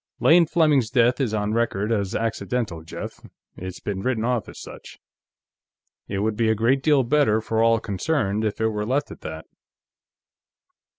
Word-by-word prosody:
"Lane 170 Hz, 0 st, +5 dB
Fleming's 150 Hz, -8 st, +3 dB
death 125 Hz, +2 st, +2 dB
is 125 Hz, -5 st, 0 dB
on 105 Hz, 0 st, -1 dB
record 110 Hz, -2 st, 0 dB
as 100 Hz, -4 st, -1 dB
accidental, 115 Hz, -5 st, -2 dB
Jeff. 80 Hz, -, -8 dB, 0.3 s
It's 95 Hz, 0 st, -7 dB
been 100 Hz, -2 st, -4 dB
written 115 Hz, -1 st, -1 dB
off 120 Hz, -3 st, -1 dB
as -, -, -11 dB
such. -, -, -11 dB, 1.1 s
It 100 Hz, -, -3 dB
would 110 Hz, 0 st, 0 dB
be 110 Hz, 0 st, +1 dB
a 110 Hz, -, +3 dB
great 120 Hz, +5 st, +2 dB
deal 145 Hz, -2 st, +3 dB
better 120 Hz, -4 st, +2 dB
for 110 Hz, 0 st, -1 dB
all 115 Hz, 0 st, +4 dB
concerned 110 Hz, -1 st, -1 dB
if 105 Hz, -1 st, -2 dB
it 110 Hz, 0 st, +2 dB
were 105 Hz, -1 st, -3 dB
left 135 Hz, +6 st, -1 dB
at -, -, -11 dB
that." 80 Hz, +1 st, -7 dB
110 Hz, 170 wpm, -23 LUFS, 105-130 Hz, 1.1 s, Lane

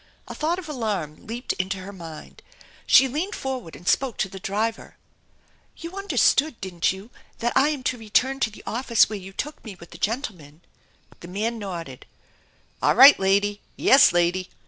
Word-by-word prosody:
A -, -, -7 dB
thought 325 Hz, +3 st, -1 dB
of 365 Hz, -4 st, -8 dB
alarm 215 Hz, -, -4 dB
leaped 235 Hz, +3 st, -3 dB
into 190 Hz, +2 st, -2 dB
her 190 Hz, +2 st, -9 dB
mind. 165 Hz, -4 st, -11 dB, 0.5 s
She 270 Hz, -, +7 dB
baned 320 Hz, -, -3 dB
forward 255 Hz, -10 st, -5 dB
and 175 Hz, -, -14 dB
spoke 265 Hz, -5 st, +1 dB
to 195 Hz, -, -1 dB
the 195 Hz, -, -9 dB
driver: 220 Hz, +4 st, -3 dB, 0.4 s
" -, -, -37 dB
You 335 Hz, +2 st, -8 dB
understood, 315 Hz, -, +2 dB
didn't 180 Hz, -3 st, -1 dB
you, 195 Hz, +5 st, -10 dB, 0.3 s
that 240 Hz, 0 st, -1 dB
I 275 Hz, +3 st, +4 dB
am 290 Hz, -4 st, -4 dB
to 250 Hz, -1 st, -2 dB
return 250 Hz, +5 st, +1 dB
to 225 Hz, -, +1 dB
the 215 Hz, -, -14 dB
office 235 Hz, -1 st, +2 dB
where 210 Hz, -, -4 dB
you 190 Hz, 0 st, -10 dB
took 295 Hz, +9 st, -6 dB
me 215 Hz, -4 st, -9 dB
with 170 Hz, -2 st, -15 dB
the 170 Hz, -, -12 dB
gentleman? 185 Hz, -, -4 dB, 0.3 s
" -, -, -28 dB
The 175 Hz, -, -11 dB
man 220 Hz, +5 st, -3 dB
nodded. 170 Hz, -, -7 dB, 0.7 s
"All -, -, +3 dB
right, 275 Hz, +2 st, +9 dB
lady. 200 Hz, +2 st, +1 dB, 0.2 s
Yes, 280 Hz, +2 st, +6 dB
lady 175 Hz, +1 st, 0 dB
215 Hz, 185 wpm, -24 LUFS, 185-265 Hz, 0.7 s, right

